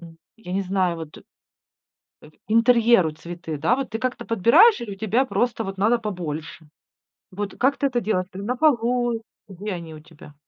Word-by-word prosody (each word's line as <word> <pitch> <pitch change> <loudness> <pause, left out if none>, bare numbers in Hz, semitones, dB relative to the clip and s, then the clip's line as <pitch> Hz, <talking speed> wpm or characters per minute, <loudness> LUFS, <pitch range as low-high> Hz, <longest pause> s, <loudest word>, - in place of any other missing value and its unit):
м 165 -1 -13 0.2
я 200 -5 -9
не 195 +1 0
знаю 185 -2 0
вот, 160 -2 -9
э, - - -16 1.3
интерьеру 230 -5 +4
цветы, 170 0 -7
да. 165 +12 +2
Вот 270 0 -4
ты 225 - -3
как-то 255 -1 -3
подбираешь 240 - +5
или 215 -4 -6
у 195 - -13
тебя 220 +5 +1
просто 225 +1 -1
вот 195 0 -6
надо 225 +4 +2
побольше? 160 -7 -6 0.7
Вот 200 +1 -5
как 270 +3 +2
ты 280 - 0
это 250 -3 0
делаешь? 185 -4 -1
Ты 195 +2 -8
на 250 +4 -2
полу, 240 -4 +1 0.3
где 200 +2 -6
они 165 -3 -7
у 155 - -11
тебя? 150 -2 -16
205 Hz, 185 wpm, -23 LUFS, 175-240 Hz, 1.3 s, подбираешь